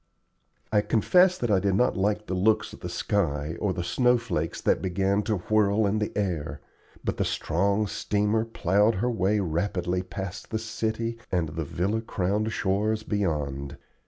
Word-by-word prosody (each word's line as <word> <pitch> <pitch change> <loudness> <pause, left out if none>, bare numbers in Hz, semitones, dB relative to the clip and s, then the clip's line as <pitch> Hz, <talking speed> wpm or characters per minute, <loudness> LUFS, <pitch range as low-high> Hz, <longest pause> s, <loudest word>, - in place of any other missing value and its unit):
I 105 - +4
confess 180 - +4
that 120 -3 -1
I 100 - +4
did 95 0 +1
not 125 +5 +2
like 105 +2 0
the 95 - -4
looks 100 +4 +2
of - - -11
the - - -5
sky 80 -5 -1
or 105 - 0
of 95 - -1
the 90 - -2
snow 125 +8 +3
flakes 85 -9 -3
that - - +1
began 95 +2 +1
to 105 +1 -1
whirl 105 +2 +2
in 105 +2 +1
the 105 - -1
air, 80 -8 -2 0.4
but - - -2
the - - +1
strong 100 +5 0
steamer 105 +2 0
plowed 105 0 +2
her 120 +6 0
way 105 -1 +1
rapidly 90 0 -1
past 95 0 -6
the 110 - -1
city 115 +1 -3
and 85 -4 0
the 80 +2 -4
villa 100 +9 -1
crowned 105 +1 -1
shores 105 +2 0
beyond. 75 -10 -2
100 Hz, 175 wpm, -26 LUFS, 90-110 Hz, 0.4 s, I